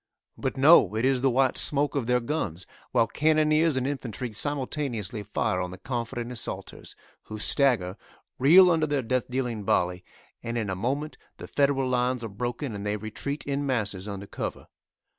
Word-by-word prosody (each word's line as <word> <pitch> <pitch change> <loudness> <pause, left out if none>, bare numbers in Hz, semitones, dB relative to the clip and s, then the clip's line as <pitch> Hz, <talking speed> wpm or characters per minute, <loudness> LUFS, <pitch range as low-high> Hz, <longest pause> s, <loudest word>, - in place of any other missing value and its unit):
But - - -3
no; 130 - +6
it 110 +3 0
is 130 -1 +2
the 135 - +3
white 130 +1 +2
smoke 145 0 +3
of 135 -6 -2
their 125 0 +3
guns, 110 - -3 0.3
while 115 - +3
cannoneers 155 +3 +2
and 130 - 0
infantry 125 -4 -4
simultaneously 130 -4 -2
fire 90 -2 -1
on 90 - -3
the 95 - -9
confident 120 +1 -4
assaulters, 120 - -5 0.3
who 110 - -7
stagger, 110 -6 +2 0.4
reel 175 +7 +7
under 160 -2 +2
their 145 -3 0
death 130 +1 -1
dealing 125 -4 -2
volley, 90 -1 0 0.4
and 115 +1 -4
in 105 -4 -2
a - - -2
moment 140 +10 -3 0.2
the - - -8
Federal 140 -2 +1
lines 125 -1 0
are 115 - -4
broken 120 +5 -4
and 100 -1 -6
they 105 0 -1
retreat 110 +7 -5
in 140 0 -1
masses 105 -8 -2
under 100 -1 -6
cover. - - -5
125 Hz, 175 wpm, -26 LUFS, 110-140 Hz, 0.4 s, reel